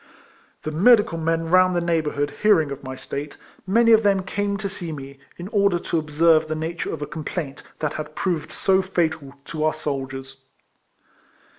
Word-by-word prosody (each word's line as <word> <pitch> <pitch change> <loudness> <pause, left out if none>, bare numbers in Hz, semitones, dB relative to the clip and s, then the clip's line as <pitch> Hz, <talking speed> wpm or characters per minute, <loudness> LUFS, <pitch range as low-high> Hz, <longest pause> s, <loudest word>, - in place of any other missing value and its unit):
The 155 - -3
medical 205 +1 +4
men 165 0 -1
round 185 0 +5
the - - +2
neighbour 165 -3 0
hood 145 +1 -2
hearing 180 -9 +4
of 140 0 -7
my 130 0 -6
state, 140 +2 -6 0.3
many 230 +4 +4
of 220 -1 +7
them 200 -3 +2
came 200 +1 -2
to 200 0 -3
see 180 -4 -6
me, 135 -2 -8 0.2
in 175 - -7
order 200 -4 +2
to 170 -1 -1
observe 155 +1 +3
the 155 - -2
nature 160 +2 -3
of - - -4
a - - -2
complaint 150 -2 -5 0.2
that 150 - -2
had 150 0 -6
proved 170 -6 -2
so 190 0 +2
fatal 160 -7 -2
to 155 -2 -4
our 155 0 +1
soldiers. 135 -3 -5
160 Hz, 180 wpm, -23 LUFS, 150-185 Hz, 0.3 s, of